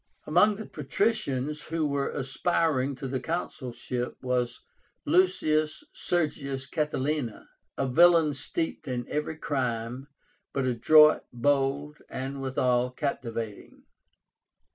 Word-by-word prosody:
Among 180 +7 +4
the 220 +1 -7
patricians 150 - -1
who 160 -1 -2
were 140 -1 -1
aspiring 140 0 0
to 135 +1 -6
the 130 0 -2
consulship 125 -7 -4
was 125 -1 -1 0.4
LUCIUS 155 -3 +2
SERGIUS 140 -6 -2
CATILÍNA, 150 -5 -1 0.3
a 135 - 0
villain 165 +2 +5
steeped 160 +4 -3
in 125 -2 -3
every 150 +1 -3
crime, 125 -3 -2 0.5
but 135 -2 0
adroit, 150 +5 +6
bold, 140 +3 0
and 135 +1 -5
withal 125 -2 +1
captivating. 115 -6 -5
140 Hz, 100 wpm, -28 LUFS, 125-155 Hz, 0.5 s, adroit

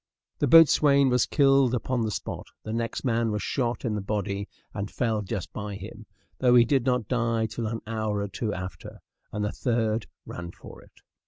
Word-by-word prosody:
The - - +2
boatswain 145 -4 +6
was 125 -1 +2
killed 135 -3 +4
upon 125 +1 -1
the 110 - 0
spot; - - -5 0.2
the 110 - -5
next 115 0 -2
man 115 -2 +1
was 105 -1 -2
shot, 120 -2 -1
in 115 - 0
the 105 - -2
body, 100 0 -3 0.2
and 100 -1 -4
fell 110 -4 -1
just 100 -2 -5
by 105 -1 -5
him, 105 +3 -10 0.3
though 125 -1 +4
he 120 -1 +7
did 135 0 +1
not 125 -4 +1
die 115 -2 +1
till 110 +1 -4
an 115 +1 -4
hour 110 -2 -2
or 100 - -2
two 105 +3 -3
after; 90 0 -7 0.3
and 105 0 -2
the 105 - -1
third 115 -3 -1 0.2
ran 85 0 -7
for - - -13
it. - - -22
115 Hz, 195 wpm, -26 LUFS, 105-125 Hz, 0.3 s, he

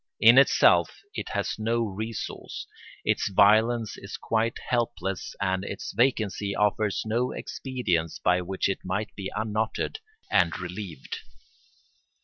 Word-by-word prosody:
In - - +8
itself - - +5 0.2
it - - -4
has - - -2
no 115 +2 +1
resource; 110 +1 -5 0.4
its - - +1
violence 110 +3 +4
is 100 - -7
quite 115 +1 0
helpless 95 -6 -2
and 95 -1 0
its 100 - -5
vacancy 105 -4 +1
offers 105 0 +1
no 120 +3 0
expedients 95 - -2
by 90 0 +2
which 95 +2 -1
it 100 - -1
might 100 +3 -2
be 95 -1 -5
unknotted 110 - -1 0.3
and 85 -4 +3
relieved. 90 -4 -6
105 Hz, 125 wpm, -27 LUFS, 95-110 Hz, 0.4 s, In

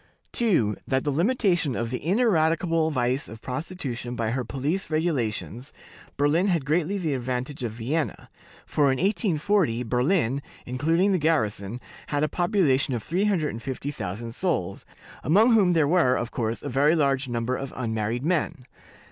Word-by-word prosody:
"2. 165 - +2
That 130 - +1
in 130 - -1
the 145 - 0
limitation 175 - +1
of 115 0 -2
the 125 - -4
ineradicable 165 -4 +2
vice 130 -2 0
of 110 +1 -10
prostitution 125 -3 -5
by 115 -2 -1
her 130 +1 -1
police 140 - -2
regulations, 135 -6 -2 0.5
Berlin 150 +7 +2
had 170 -7 +1
greatly 170 +6 +1
the 165 -6 -1
advantage 130 +2 -3
of 115 -3 -3
Vienna; 135 +8 -2 0.4
for 150 - +1
in 135 -1 +3
1840, 190 - +1
Berlin 130 +2 +1 0.2
(including 165 +10 +1
the 185 - +2
garrison) 110 -8 0 0.3
had 145 0 0
a - - +3
population 155 - +1
of 115 - -4
350,000 140 - -2
souls, 100 - -2 0.4
among 215 +10 +5
whom 195 -5 +4
there 160 -3 +3
was, 145 -6 +3
of 120 -1 -4
course, 115 -1 -2
a - - -4
very 145 +5 +3
large 140 -3 +1
number 120 +1 -1
of 135 0 -5
unmarried 115 +1 -2
men. 165 -5 -1
145 Hz, 150 wpm, -25 LUFS, 125-170 Hz, 0.5 s, among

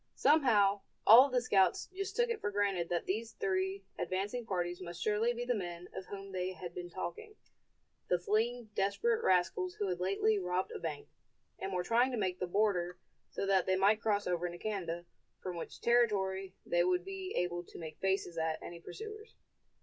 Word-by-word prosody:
Somehow 215 -10 +4 0.2
all 240 +6 +10
of - - -11
the 250 -1 +2
scouts 190 -6 +3
just 390 +1 -4
took 480 0 +2
it 465 - -3
for - - 0
granted 200 -4 0
that 175 -1 -1
these 220 +4 -2
three 190 +1 -1 0.2
advancing 205 +6 -2
parties 175 -2 -2
must 175 -1 -7
surely 215 +4 +2
be 240 0 -4
the 245 - +1
men 175 -4 -5
of 190 - -6
whom 195 -1 -7
they 185 0 -2
had 175 -2 -8
been 175 0 -6
talking, 425 - -6 0.7
the 180 - +3
fleeing 220 +5 0
desperate 445 - +1
rascals 180 0 +2
who 205 - -2
had 180 -1 -2
lately 200 +3 +2
robbed 180 0 -1
a - - -5
bank, 155 -3 -5 0.5
and 195 - -3
were 180 -1 -1
trying 235 +7 +3
to 250 - -3
make 185 -3 -1
the 180 - -1
border 180 -2 +1 0.3
so - - -3
that 195 -2 +3
they 185 - +3
might 205 +3 +4
cross 205 -2 +1
over 175 0 0
into 175 0 -7
Canada, 175 -5 -3 0.3
from 180 -1 -5
which 170 - -7
territory 195 -5 +2
they 175 0 +2
would 180 0 +1
be 385 -1 -5
able 175 0 -1
to - - -13
make 160 -2 -8
faces 190 -3 0
at 160 0 0
any 170 0 -8
pursuers. 430 - -9
195 Hz, 195 wpm, -33 LUFS, 180-225 Hz, 0.7 s, all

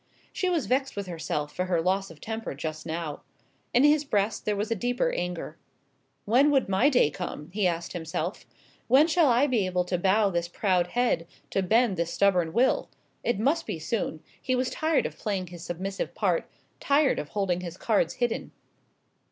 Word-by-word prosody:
She 370 - 0
was 335 -5 0
vexed 270 +2 0
with 200 -1 -3
herself 150 -4 -3
for 180 - -1
her 180 -2 +1
loss 190 +3 0
of 165 -2 -13
temper 220 -8 -5
just 155 +2 -5
now. 160 -2 -4 0.5
In 245 - +4
his 295 0 +5
breast 205 -6 0
there 210 - +1
was 210 +3 -2
a - - +2
deeper 245 +4 0
anger. 180 -1 -4 0.7
"When 255 +7 +4
would 275 -3 +2
my 195 +9 +3
day 245 - +3
come?" 150 +3 -6
he 200 -2 +2
asked 170 -1 -3
himself. 165 +1 -4 0.4
"When 265 +5 +6
shall 330 -1 +3
I 245 +3 +4
be 245 -7 +1
able 180 -1 0
to 180 -1 -1
bow 195 +2 +3
this 170 -1 -1
proud 180 -1 +1
head, 235 -6 0 0.2
to 195 - +1
bend 220 +1 +2
this 170 0 -1
stubborn 180 -5 +2
will?" 245 +9 +2 0.3
It 240 - +1
must 290 +10 +1
be - - -3
soon 160 -1 -3 0.2
he 255 - 0
was 255 0 0
tired 315 -1 +1
of - - -5
playing 195 -4 -2
his 175 -1 -10
submissive 190 +3 -4
part - - 0 0.3
tired 280 0 +3
of 150 - -5
holding 185 -3 -1
his 175 0 -7
cards 205 -7 +1
hidden. 240 -2 -2
195 Hz, 190 wpm, -27 LUFS, 175-245 Hz, 0.7 s, When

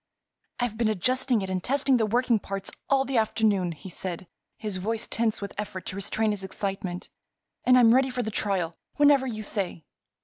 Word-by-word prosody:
"I've 245 -3 -1
been 230 - +3
adjusting 245 +2 +1
it 190 - -4
and 185 -1 -2
testing 270 0 +2
the 220 -2 +1
working 240 +1 +2
parts 195 0 -5 0.2
all 270 -1 +3
the 260 -3 +1
afternoon," 215 -5 +1
he 175 +5 -11
said, 180 0 -5 0.3
his 210 -4 -3
voice 220 +4 -1
tense 225 -2 0
with 200 - -5
effort 190 -3 -5
to - - -5
restrain 210 +2 0
his 205 -2 -4
excitement, 190 -2 -4 0.5
"and 255 0 +6
I'm 235 -2 +7
ready 265 +1 +4
for 250 -1 -2
the 220 - -3
trial 190 -6 0 0.2
whenever 285 -2 +5
you 215 -3 -4
say." 190 -5 -3
215 Hz, 190 wpm, -27 LUFS, 195-245 Hz, 0.5 s, I'm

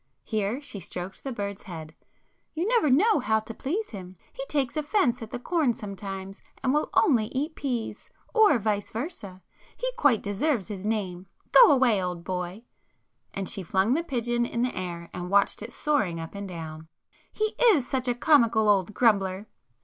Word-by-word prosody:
—here 215 +2 -1
she 280 -8 -6
stroked 180 0 -6
the 270 - -4
bird's 200 -4 -4
head—"You 170 - -8
never 460 - +3
know 365 - +4
how 220 -3 +2
to 225 +1 -8
please 365 - -3
him,—he 185 +5 -9
takes 275 -5 -1
offence 300 - +1
at 225 - -7
the - - -4
corn 275 -2 +1
sometimes 195 -1 -7 0.2
and 260 0 +2
will 300 - +1
only 250 - +4
eat 290 +7 -3
peas, 240 -8 -4 0.2
or 435 - +6
vice 210 -2 -1
versa. 215 - -6 0.3
He - - -2
quite 275 - +3
deserves 220 - 0
his 200 -1 -5
name,—go 200 - +3
away, 250 -7 +4
old 180 -2 -4
boy!" 180 +3 -4 0.7
and 195 -1 -4
she 195 - -1
flung 190 +6 +1
the 320 - +1
pigeon 240 -6 -1
in 235 0 -1
the 250 - -1
air 170 -2 -5
and 180 0 -5
watched 200 +1 +2
it 225 +3 -7
soaring 215 - 0
up 165 0 -7
and 200 0 -6
down—"He 165 - -6
is 380 - +5
such 260 -1 -1
a 245 - +1
comical 235 -6 +4
old 200 0 +2
grumbler! 200 -4 +2
220 Hz, 165 wpm, -27 LUFS, 190-275 Hz, 0.7 s, or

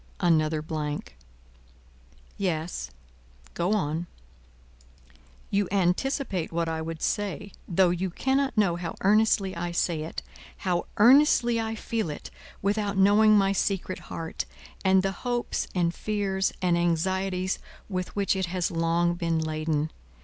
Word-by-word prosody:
Another 155 -3 +2
blank. 150 -2 -4 1.2
"Yes, 165 - -2 0.6
go 175 +4 0
on." 165 -3 -1 1.4
"You 200 -1 +2
anticipate 195 - 0
what 165 0 -1
I 160 0 -2
would 160 0 -5
say, 205 -1 -2 0.2
though 180 0 +3
you 180 +2 -1
cannot 265 +7 0
know 185 -5 +3
how 175 -1 -5
earnestly 205 -1 +3
I 175 +1 -3
say 170 -2 0
it, 160 - -5 0.3
how 180 -2 -1
earnestly 240 -1 +5
I 225 0 -3
feel 225 -4 -2
it, 150 - -7 0.3
without 205 0 0
knowing 210 +2 +6
my 195 -1 +3
secret 195 -1 -1
heart, 165 -1 -4 0.4
and 190 -1 +4
the 195 - +1
hopes 245 -1 -1
and 170 -2 +2
fears 195 -2 -1
and 175 -1 +3
anxieties 185 +2 0 0.3
with 185 -3 -4
which 200 -1 +1
it 190 -2 -1
has 180 0 -1
long 170 +1 +1
been 170 -2 -1
laden. 155 -1 -1
185 Hz, 130 wpm, -27 LUFS, 165-205 Hz, 1.4 s, knowing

